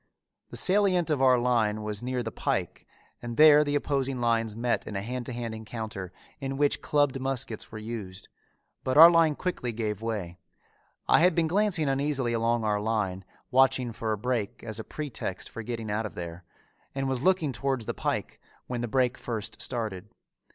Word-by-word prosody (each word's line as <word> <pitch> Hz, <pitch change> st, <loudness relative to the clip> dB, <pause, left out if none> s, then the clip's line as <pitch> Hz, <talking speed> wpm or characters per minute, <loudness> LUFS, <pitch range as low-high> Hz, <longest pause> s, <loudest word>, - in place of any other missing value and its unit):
The -, -, -5 dB
salient 185 Hz, -4 st, +3 dB
of 145 Hz, -3 st, +1 dB
our 130 Hz, -1 st, +6 dB
line 115 Hz, -3 st, +1 dB
was 105 Hz, -1 st, -3 dB
near 125 Hz, 0 st, -2 dB
the 110 Hz, -, -4 dB
pike -, -, -3 dB, 0.3 s
and 120 Hz, -1 st, -6 dB
there 150 Hz, -1 st, +8 dB
the 145 Hz, -1 st, -1 dB
opposing 135 Hz, -3 st, 0 dB
lines 115 Hz, -2 st, +1 dB
met 120 Hz, +1 st, -1 dB
in 105 Hz, -, -6 dB
a 100 Hz, -, -1 dB
hand 125 Hz, +2 st, -4 dB
to -, -, -4 dB
hand 120 Hz, -2 st, -4 dB
encounter 110 Hz, -4 st, -6 dB, 0.3 s
in 135 Hz, -1 st, -4 dB
which 145 Hz, 0 st, +2 dB
clubbed 145 Hz, -2 st, +1 dB
muskets 130 Hz, -4 st, -3 dB
were 110 Hz, -, -7 dB
used, 105 Hz, -4 st, -7 dB, 0.6 s
but 130 Hz, +2 st, 0 dB
our 165 Hz, +2 st, +11 dB
line 165 Hz, -3 st, +4 dB
quickly 175 Hz, -9 st, -3 dB
gave 110 Hz, -2 st, -3 dB
way. 105 Hz, -7 st, -4 dB, 0.7 s
I -, -, +6 dB
had 175 Hz, 0 st, +4 dB
been 170 Hz, -, +3 dB
glancing 180 Hz, -2 st, +1 dB
uneasily 135 Hz, -3 st, 0 dB
along 115 Hz, 0 st, +1 dB
our 105 Hz, -1 st, 0 dB
line, 105 Hz, -4 st, -1 dB, 0.3 s
watching 130 Hz, -2 st, +3 dB
for 110 Hz, 0 st, -3 dB
a 110 Hz, -, 0 dB
break 115 Hz, -2 st, -2 dB
as 110 Hz, -1 st, -5 dB
a -, -, -4 dB
pretext 140 Hz, -11 st, -5 dB
for 115 Hz, -, -6 dB
getting 115 Hz, -1 st, -4 dB
out 110 Hz, +1 st, -1 dB
of -, -, -14 dB
there, 85 Hz, 0 st, -7 dB, 0.5 s
and 135 Hz, 0 st, -1 dB
was 130 Hz, -2 st, -1 dB
looking 180 Hz, -4 st, +2 dB
towards 130 Hz, -2 st, -2 dB
the -, -, -2 dB
pike -, -, -3 dB, 0.2 s
when 120 Hz, -1 st, -4 dB
the 120 Hz, -, -2 dB
break 125 Hz, +1 st, +1 dB
first 110 Hz, -2 st, -5 dB
started. 110 Hz, -7 st, -2 dB
120 Hz, 185 wpm, -28 LUFS, 110-135 Hz, 0.7 s, our